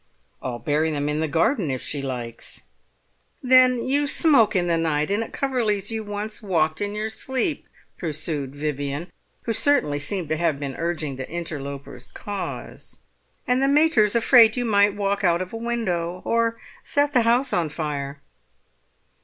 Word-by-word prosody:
"I'll 125 -2 -4
bury 155 +4 0
them 145 -2 -2
in 150 +1 -1
the 160 - 0
garden 165 - +1
if 130 -2 -3
she 145 - -3
likes." 120 -4 -6 0.8
"Then 255 -1 +5
you 285 +2 +2
smoke 270 -9 +4
in 180 -2 +2
the 170 -1 +1
night, 155 -1 0
and 210 +3 +1
at - - -10
Coverley's 225 -7 0
you 220 -1 -3
once 205 +1 -5
walked 160 -5 0
in 205 0 -2
your 215 +1 -2
sleep," 265 +6 -2 0.3
pursued 150 -4 -3
Vivian, 145 +2 -3 0.3
who 230 - -1
certainly 220 - +2
seemed 175 +4 -2
to 155 - 0
have 160 -4 0
been 140 -2 -4
urging 160 -5 -3
the 130 - -6
interloper's 145 -5 -6
cause. 205 -2 -6 0.4
"And 250 +1 +1
the 275 - +3
mater's 280 -8 +4
afraid 230 0 +6
you 245 - 0
might 205 -2 +3
walk 200 0 -1
out 170 -2 +3
of 185 +2 -5
a - - -3
window 185 -7 -2
or 230 0 +1 0.3
set 285 0 +1
the 245 - +5
house 240 +3 +2
on 170 -3 +1
fire." 145 -2 -4
185 Hz, 165 wpm, -23 LUFS, 150-230 Hz, 0.8 s, afraid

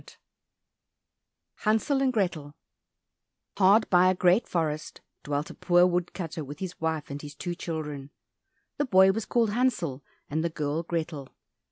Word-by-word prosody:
15 - - -17 1.4
Hansel 225 +6 +1
and 265 -1 +2
Grethel 170 - -2 1.0
Hard 205 +3 +5
by 180 0 +6
a 185 - +2
great 180 +5 +3
forest 155 -3 -3 0.2
dwelt 145 +1 -2
a - - -9
poor 175 0 +4
wood 180 -1 0
cutter 165 -3 -5
with 145 +1 -8
his 185 -3 -7
wife 160 -2 -2
and 140 +1 -5
his 145 -1 -9
two 175 +3 -4
children. 150 -5 -5 0.7
The 290 - +1
boy 190 -5 +6
was 220 +2 -4
called 230 -3 +2
Hansel 185 - 0 0.2
and 155 +2 -2
the 170 - 0
girl 155 0 -2
Grethel. 160 -5 -4
170 Hz, 155 wpm, -27 LUFS, 150-190 Hz, 1.4 s, by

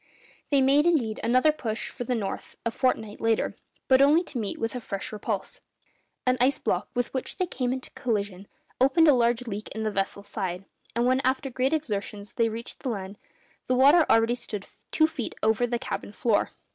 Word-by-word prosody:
They 280 -2 +4
made, 285 +4 +4
indeed, 240 -11 +1
another 255 +6 +4
push 235 -7 -4
for 245 - -6
the 250 - 0
north 200 -4 -4
a 230 - +1
fortnight 220 -4 -1
later, 225 -1 +1 0.3
but 260 0 +5
only 300 +5 +5
to 285 -7 -5
meet 210 -3 -3
with 225 - -2
a 250 - -4
fresh 195 -3 -5
repulse. 210 -1 -4 0.6
An 255 0 +3
ice 265 +3 +4
block - - -1
with 245 -1 -1
which 260 - -3
they 370 - +1
came 255 -7 -2
into 260 0 -5
collision 200 -4 -3 0.3
opened 270 +6 +5
a 295 - +8
large 240 0 +2
leak 210 -2 -5
in 220 - -3
the 215 - 0
vessel's 200 0 -2
side; 190 -2 -4 0.3
and 235 +1 +2
when 255 +1 +3
after 265 +1 0
great 255 +2 +1
exertions 210 -8 -3
they 230 -1 +2
reached 230 +2 -7
the 260 - -3
land, 200 -2 -5 0.5
the 255 - +2
water 285 +6 +7
already 225 +1 +4
stood 220 -4 -6 0.2
two 315 - +4
feet 310 -7 -4
over 220 +2 +3
the 240 0 -1
cabin 215 - -5
floor. 210 0 +1
240 Hz, 195 wpm, -27 LUFS, 215-265 Hz, 0.6 s, a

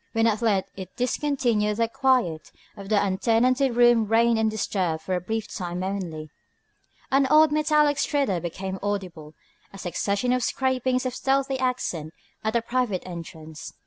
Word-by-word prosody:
When 225 0 +2
at 220 -1 +1
length 205 -5 +1
it 190 -1 -9
discontinued 245 -5 0
the 230 0 +2
quiet 250 - 0 0.2
of 200 -2 -10
the 215 -2 +3
untenanted 235 +6 +2
rooms 240 -3 +4
reigned 230 0 +3
undisturbed 200 -7 -1
for 190 - -3
a 180 - 0
brief 220 +4 -3
time 180 -1 -5
only. 170 -6 -4 0.8
An 270 0 +3
odd 305 +2 +5
metallic 300 -1 +3
stridor 275 - 0
became 190 +3 -5
audible, 180 -7 -4 0.4
a 195 - -11
succession 200 +6 -1
of 255 - +1
scrapings 255 0 0
of 255 - -2
stealthy 270 0 0
accent 180 -11 -2 0.3
at 220 0 -1
the 235 -1 +1
private 235 -6 -1
entrance. 160 -3 -9
220 Hz, 150 wpm, -25 LUFS, 185-255 Hz, 0.8 s, odd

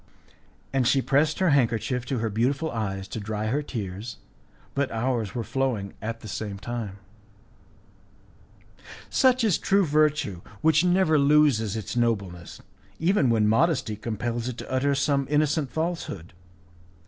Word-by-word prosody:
And 130 -3 +2
she 135 - +4
pressed 145 +4 +2
her 185 -4 +3
handkerchief 125 -1 +1
to 135 - -1
her 110 -1 -1
beautiful 135 +9 0
eyes 95 -4 -3
to - - -4
dry 105 0 -3
her 140 +6 0
tears, 105 -4 -6 0.6
but 140 -1 0
ours 115 -3 -2
were 120 - -2
flowing 115 -5 -2
at 115 +2 -4
the - - -9
same 100 0 -4
time. 105 -1 -5 2.1
Such 255 -2 +4
is 205 -8 +2
true 195 0 +3
virtue, 150 - +1 0.2
which 160 +1 +4
never 180 -4 +3
loses 140 -7 +3
its 110 +2 -5
nobleness, 100 -8 -2 0.3
even 165 -5 +2
when 110 -2 +3
modesty 115 -1 +2
compels 115 +2 -3
it 125 -2 -4
to - - -8
utter 140 +2 +1
some 140 -1 +1
innocent 150 -1 +1
falsehood. 160 - -4
125 Hz, 140 wpm, -26 LUFS, 110-150 Hz, 2.1 s, she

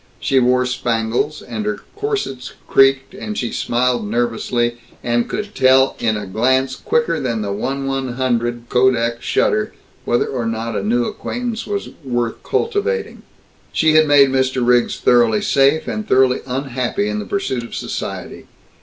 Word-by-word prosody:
She 135 - +2
wore 125 0 +3
spangles, 120 +3 -1
and 215 - -5
her 210 0 -2
corsets 405 - -3
creaked, 135 +3 +3
and 210 +2 -6
she 120 - -2
smiled 120 -2 0
nervously, 120 +1 -1 0.2
and 120 0 0
could 210 -1 -4
tell 130 -2 +4
in 110 -2 +1
a 105 - -5
glance 130 +7 +1
quicker 470 0 0
than 115 -4 -2
the 100 - -3
1/100 125 0 -2
kodak 120 -2 +2
shutter 215 0 +1 0.3
whether 120 - +1
or 120 -4 -3
not 115 0 -3
a - - -1
new 120 +4 +1
acquaintance 235 -2 -4
was 200 -1 -3
"worth 120 -3 -2
cultivating." 455 +1 -1 0.5
She 160 -1 +3
had 155 0 +5
made 145 -2 +6
Mr. 130 -1 +1
Riggs 120 0 +3
thoroughly 120 -3 +3
safe 140 +3 +3
and 215 -1 -4
thoroughly 130 0 +3
unhappy 125 -4 -2
in 105 0 -2
the 105 - -5
pursuit 135 -11 -2
of 115 - -8
society. - - -5
125 Hz, 150 wpm, -19 LUFS, 120-140 Hz, 0.5 s, made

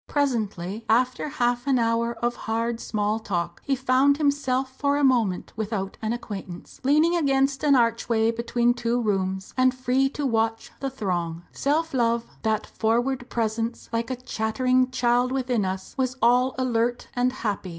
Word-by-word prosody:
Presently, 220 - -1
after 250 +5 +2
half 245 -1 0
an 270 -2 +3
hour 230 0 +1
of 240 0 +1
hard 230 +1 -2
small 210 -1 -1
talk, 175 -5 -3
he 275 - +1
found 265 +2 +3
himself 270 -3 0
for 285 +1 +1
a 290 - +1
moment 235 -9 +2
without 210 -3 -3
an 220 0 -1
acquaintance, 200 -6 -7
leaning 305 +6 +4
against 275 -3 +1
an 290 -2 +5
archway 230 -1 +2
between 235 +1 +1
two 240 0 -1
rooms, 190 -3 -1
and 255 0 +3
free 255 +1 +1
to 290 +1 -4
watch 225 -2 0
the 275 - -2
throng. 175 -9 -3
Self 315 +3 0
love, 235 -2 +1 0.2
"that 220 -1 0
froward 245 +3 -1
presence, 225 0 -2
like 230 +1 -1
a 260 - -1
chattering 255 +2 0
child 245 0 +2
within 250 -5 0
us," 190 0 -4
was 255 0 0
all 250 +3 +3
alert 240 -1 0
and 250 0 +2
happy. 210 -7 -3
240 Hz, 160 wpm, -25 LUFS, 220-260 Hz, 0.2 s, an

